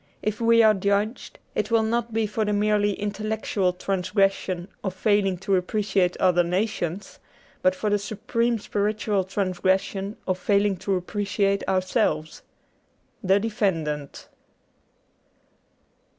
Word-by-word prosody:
If 215 +1 -2
we 230 0 +5
are 215 -1 +6
judged, 200 +3 -1 0.2
it 210 - -1
will 230 -1 +3
not 235 +1 -1
be 225 0 0
for 215 +1 -1
the 210 0 0
merely 205 -1 +2
intel 210 +1 -4
lectual 185 -4 -1
transgression 195 -1 0 0.2
of 190 -2 -3
failing 200 -2 +2
to 195 +2 0
appreciate 185 -1 0
other 180 -1 +3
nations, 185 0 -2 0.4
but 185 0 +3
for 210 +2 -2
the 205 - +2
supreme 230 +3 -1
spiritual 205 -1 -1
transgression 190 +1 -1
of 185 0 0
failing 200 0 +2
to 195 +2 -1
appreciate 200 +1 -1
ourselves. 185 -4 0 0.4
* - - -41
The 195 +1 +6
Defendant.' 165 -10 -2
200 Hz, 125 wpm, -25 LUFS, 185-215 Hz, 0.4 s, are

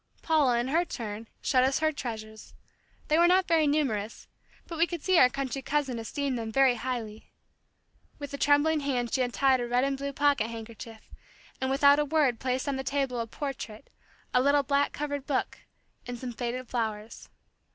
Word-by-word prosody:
Paula 290 -7 +3
in 240 +2 -1
her 330 +5 +2
turn, 225 -8 -6 0.2
showed 255 -2 +3
us 265 +1 +2
her 315 0 +1
treasures. 220 -6 -7 0.5
They 310 +2 +3
were 345 - +6
not 370 +1 +3
very 320 -2 +3
numerous, 235 -8 -1 0.4
but 335 -2 -7
we 335 - +4
could 340 -3 -6
see 370 -3 +4
our 250 - +7
country 275 +1 -4
cousin 275 -4 -1
esteemed 260 +3 -3
them 225 -1 -4
very 265 +1 +4
highly. 230 -3 -5 0.9
With 285 -2 -8
a - - -3
trembling 290 +2 +3
hand 255 -4 -2
she 265 - +2
untied 260 +1 +2
a 240 - -3
red 245 +1 +2
and 275 0 0
blue 280 +1 -4
pocket 285 -5 +2
handkerchief, 225 0 -10 0.5
and 260 - 0
without 280 +2 +5
a 295 - +2
word 285 -5 +1
placed 255 +1 -2
on 275 -1 -1
the 265 - -3
table 270 -2 -1
a 230 - -3
portrait, 235 -5 -7 0.4
a 250 - +4
little 285 +1 +3
black 280 +1 +1
covered 285 -2 -4
book, 275 - -1 0.5
and 245 0 -5
some 245 0 -6
faded 245 +1 -4
flowers. 220 -2 -4
265 Hz, 185 wpm, -28 LUFS, 235-285 Hz, 0.9 s, our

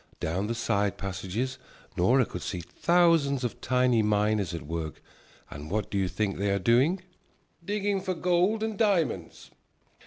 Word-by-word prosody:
Down 90 +6 -1
the 115 - -2
side 105 -3 0
passages 100 +7 -4 0.4
Nora 125 +8 +4
could 90 - -7
see 90 0 -4
thousands 165 - +2
of 120 - -4
tiny 125 -2 +2
miners 105 -2 +1
at 85 -3 -5
work. 80 0 -5 0.5
And 75 +2 -8
what 105 +1 -2
do 100 - 0
you 95 - +1
think 100 +2 -2
they 100 +1 0
are 100 - +2
doing? 130 - +2 0.6
"Digging 205 0 -1
for 185 -1 -2
gold 180 +6 +1
and 220 -2 -3
diamonds." 170 - 0
115 Hz, 155 wpm, -28 LUFS, -, 0.6 s, Nora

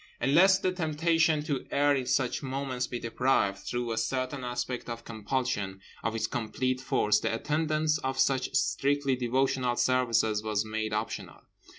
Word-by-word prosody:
And 135 +3 +1
lest 190 +4 +6
the 185 - +2
temptation 160 -2 +1
to 145 -4 -3
err 145 0 +3
in 130 -2 -2
such 130 -1 +1
moments 130 -2 -3
be 120 - -4
deprived, 115 -4 +1
through 120 +3 -3
a 110 - 0
certain 130 +3 -2
aspect 125 0 -3
of 115 0 -6
compulsion, 110 -3 -2 0.2
of 115 +1 -1
its 115 - 0
complete 130 +3 -2
force, 105 -5 +2
the - - -1
attendance 155 +4 0
of 130 -1 -3
such 130 -1 +2
strictly 135 +7 +1
devotional 125 0 0
services 115 -4 +2
was 105 -1 -1
made 110 0 -3
optional. 105 +1 -4
130 Hz, 160 wpm, -29 LUFS, 115-140 Hz, 0.2 s, lest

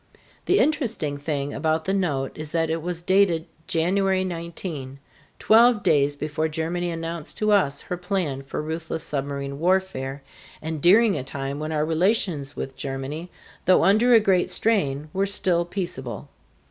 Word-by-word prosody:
The - - +4
interesting 230 - 0
thing 145 -1 -3
about 160 +2 0
the 190 - 0
note 145 -9 0
is 155 -1 -7
that 165 -1 +1
it 165 0 -1
was 175 0 -4
dated 185 -3 +3 0.2
January 190 +3 +1
19, 165 -6 -5 0.4
twelve 230 -1 +5
days 145 -1 +3
before 150 +2 -2
Germany 165 +3 -2
announced 165 -1 -5
to 215 0 +1
us 180 -9 +2
her 180 - -5
plan 180 -7 -2
for 140 +2 -5
ruthless 160 0 -4
submarine 140 -1 -3
warfare, 165 -7 0 0.4
and 160 -1 -5
during 205 +4 +5
a - - -5
time 135 +1 -4
when 155 +1 -4
our 150 -1 0
relations 165 -4 0
with 135 - -5
Germany, 140 +6 -5 0.4
though 185 - +5
under 230 +5 +5
a - - +8
great 190 -4 +2
strain, 150 -10 0
were 195 +1 +1
still 180 -3 +1
peaceable. 155 - -5
165 Hz, 155 wpm, -24 LUFS, 145-190 Hz, 0.4 s, a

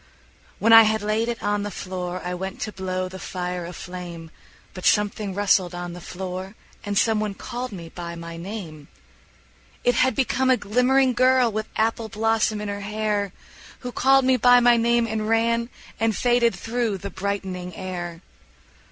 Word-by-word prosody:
When 225 +4 +4
I 225 - +12
had 220 -1 +2
laid 215 +2 0
it 235 - -4
on 205 0 0
the 205 - -3
floor 185 -2 -5
I 180 - -2
went 190 +1 -5
to 215 - -3
blow 185 -1 -3
the 190 +1 -9
fire 180 -2 -4
aflame, 175 -2 -8 0.4
But 185 - -9
something 205 -2 +1
rustled 190 -3 +2
on 175 0 -5
the 175 - -9
floor, 185 +2 -6 0.3
And 205 -1 -2
some 220 0 +3
one 210 -2 -2
called 250 +4 -5
me 175 -4 -8
by 170 0 -7
my 170 0 -8
name: 165 -5 -7 1.0
It 245 - +3
had 260 +2 +2
become 265 -1 +1
a 255 - +5
glimmering 250 +5 +2
girl 255 -1 +4
With 215 +1 -3
apple 225 0 0
blossom 220 0 +1
in 210 - -4
her 200 0 -4
hair 210 -1 -1 0.5
Who 250 - -5
called 270 +1 +4
me 260 0 +4
by 245 +1 +6
my 240 0 +5
name 235 0 +2
and 220 -1 -2
ran 230 +1 +2 0.3
And 225 -1 +1
faded 240 -1 +3
through 230 -3 -2
the 200 +1 -7
brightening 190 -2 -4
air. 175 -2 -5
210 Hz, 175 wpm, -24 LUFS, 185-230 Hz, 1.0 s, I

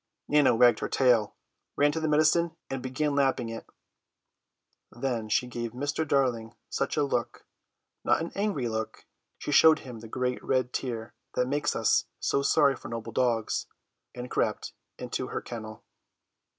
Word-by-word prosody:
Nana 145 -5 +4
wagged 120 -1 +5
her - - -3
tail, 120 -5 +3 0.4
ran 145 +1 +4
to 160 - -2
the 160 - -1
medicine, 155 +2 +3 0.2
and 135 -1 -3
began 135 +4 -1
lapping 135 -4 +1
it. 115 0 -7 1.2
Then 120 -3 -3
she 125 - +2
gave 120 -2 -5
Mr. 145 +5 -2
Darling 125 -5 0 0.2
such 140 - -1
a 150 - +3
look, 125 -4 -2 0.6
not - - +3
an 165 +1 -4
angry 200 - -1
look: 110 -1 -4 0.3
she - - -5
showed 155 +2 +7
him 125 -4 -9
the 115 - -10
great 125 +2 -2
red 130 -2 0
tear 115 -4 -4 0.2
that 125 - +1
makes 145 +2 0
us - - +2
so 140 - +1
sorry 140 -1 +4
for - - -10
noble 115 0 -5
dogs, 120 -3 0 0.5
and 125 0 -7
crept - - -1 0.2
into - - -4
her - - -3
kennel. 110 -2 -8
130 Hz, 160 wpm, -28 LUFS, 115-145 Hz, 1.2 s, showed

